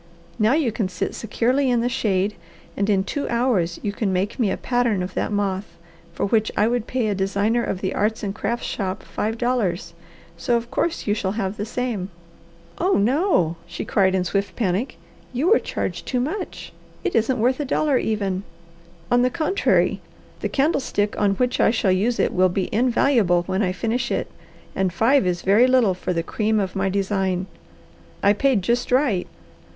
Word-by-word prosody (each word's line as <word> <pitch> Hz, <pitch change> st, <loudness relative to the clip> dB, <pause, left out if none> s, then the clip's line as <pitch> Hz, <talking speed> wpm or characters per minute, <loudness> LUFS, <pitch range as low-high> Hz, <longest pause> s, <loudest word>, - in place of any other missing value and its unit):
Now 220 Hz, +3 st, +4 dB
you 290 Hz, -6 st, +2 dB
can 210 Hz, -3 st, -2 dB
sit 180 Hz, -, -3 dB
securely 250 Hz, +5 st, 0 dB
in 240 Hz, -2 st, +2 dB
the 240 Hz, -, +1 dB
shade, 210 Hz, -5 st, 0 dB, 0.4 s
and 200 Hz, +1 st, 0 dB
in 195 Hz, -2 st, +3 dB
two 285 Hz, +8 st, -3 dB
hours 235 Hz, -9 st, +1 dB
you 205 Hz, -, -1 dB
can 205 Hz, -2 st, -1 dB
make 190 Hz, +6 st, -1 dB
me 225 Hz, -5 st, +2 dB
a 190 Hz, -, -1 dB
pattern 240 Hz, -6 st, 0 dB
of 185 Hz, +1 st, -6 dB
that -, -, -2 dB
moth, 195 Hz, -3 st, -2 dB, 0.3 s
for 170 Hz, -, -2 dB
which 220 Hz, +1 st, +1 dB
I 210 Hz, -, +4 dB
would 240 Hz, -1 st, -1 dB
pay 250 Hz, -3 st, 0 dB
a 210 Hz, -, +1 dB
designer 200 Hz, +4 st, 0 dB
of 185 Hz, -, -3 dB
the 190 Hz, -, -1 dB
arts 215 Hz, +2 st, 0 dB
and 195 Hz, -1 st, -2 dB
crafts 235 Hz, +3 st, -3 dB
shop 190 Hz, -2 st, -3 dB
five 220 Hz, +2 st, -3 dB
dollars, 205 Hz, -9 st, -1 dB, 0.4 s
so 235 Hz, +8 st, +1 dB
of 235 Hz, +2 st, -6 dB
course 330 Hz, +5 st, -1 dB
you 205 Hz, -, +2 dB
shall 200 Hz, -2 st, -2 dB
have 200 Hz, -2 st, -2 dB
the 210 Hz, +1 st, -4 dB
same." 230 Hz, -6 st, -3 dB, 0.7 s
"Oh 370 Hz, +3 st, +2 dB
no!" 220 Hz, -, +2 dB
she -, -, -6 dB
cried 190 Hz, -2 st, +2 dB
in 185 Hz, -, +1 dB
swift 200 Hz, +3 st, -2 dB
panic. 205 Hz, +2 st, -1 dB, 0.4 s
"You 295 Hz, -, +1 dB
were 460 Hz, -, +6 dB
charged -, -, -4 dB
too 250 Hz, -, 0 dB
much! 360 Hz, +10 st, -4 dB, 0.3 s
It 375 Hz, -, -1 dB
isn't 235 Hz, +3 st, +2 dB
worth 250 Hz, +4 st, +1 dB
a -, -, 0 dB
dollar, 275 Hz, 0 st, +1 dB
even!" 200 Hz, -4 st, -1 dB, 0.7 s
"On 245 Hz, -, +5 dB
the 250 Hz, -, +3 dB
contrary 335 Hz, +7 st, +1 dB, 0.4 s
the -, -, -2 dB
candlestick 270 Hz, -8 st, 0 dB
on 200 Hz, -1 st, +3 dB
which 250 Hz, +4 st, 0 dB
I -, -, +5 dB
shall 215 Hz, -4 st, +1 dB
use 215 Hz, +6 st, +1 dB
it -, -, +1 dB
will 185 Hz, 0 st, +4 dB
be 185 Hz, +1 st, -2 dB
invaluable 230 Hz, -6 st, +3 dB
when 190 Hz, +3 st, -1 dB
I 185 Hz, -3 st, +1 dB
finish 230 Hz, +6 st, -1 dB
it, -, -, -2 dB, 0.4 s
and 190 Hz, -1 st, +1 dB
five 225 Hz, +5 st, +3 dB
is 175 Hz, -1 st, -1 dB
very 210 Hz, +6 st, +5 dB
little 255 Hz, -7 st, +4 dB
for 180 Hz, 0 st, -4 dB
the 165 Hz, -2 st, -1 dB
cream 215 Hz, +4 st, 0 dB
of 190 Hz, -2 st, -2 dB
my 195 Hz, 0 st, 0 dB
design. 190 Hz, -1 st, 0 dB, 0.8 s
I 200 Hz, -, +6 dB
paid 235 Hz, -2 st, +2 dB
just 240 Hz, +6 st, 0 dB
right. 250 Hz, -9 st, +2 dB
215 Hz, 190 wpm, -22 LUFS, 190-245 Hz, 0.8 s, were